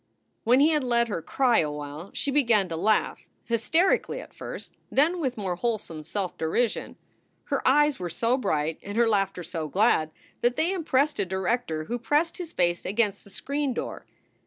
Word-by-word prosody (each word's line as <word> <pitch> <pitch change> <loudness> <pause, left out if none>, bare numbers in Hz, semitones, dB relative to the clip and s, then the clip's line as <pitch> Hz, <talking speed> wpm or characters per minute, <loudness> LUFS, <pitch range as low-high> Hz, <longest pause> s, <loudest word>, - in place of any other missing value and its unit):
When 250 +4 +5
he 300 - +6
had 300 -3 +2
let 235 -2 +2
her 200 - -2
cry 245 +5 +2
awhile, 150 +3 -4
she 280 - 0
began 230 -9 +3
to 165 - -3
laugh, 210 +6 +1 0.3
hysterically 320 - +1
at - - -11
first, - - -8 0.2
then 330 +6 +3
with 260 -6 -2
more 190 -4 -2
wholesome 210 -8 -2
self 180 +4 -4
derision. 210 +9 -1 0.5
Her 280 -3 -1
eyes 295 +1 +4
were 180 -1 -3
so 230 +8 +1
bright 155 - -1
and 205 +2 -6
her 235 0 +4
laughter 195 -4 0
so 165 -2 -4
glad 185 -3 +2 0.3
that 240 +1 +2
they 335 +7 +1
impressed 300 - +1
a - - +3
director 190 -3 -1
who 240 +9 -3
pressed 300 +8 +1
his 340 -2 -6
face 175 -1 0
against 205 0 0
the - - -14
screen 280 +5 -2
door. - - -5
230 Hz, 180 wpm, -26 LUFS, 180-275 Hz, 0.5 s, he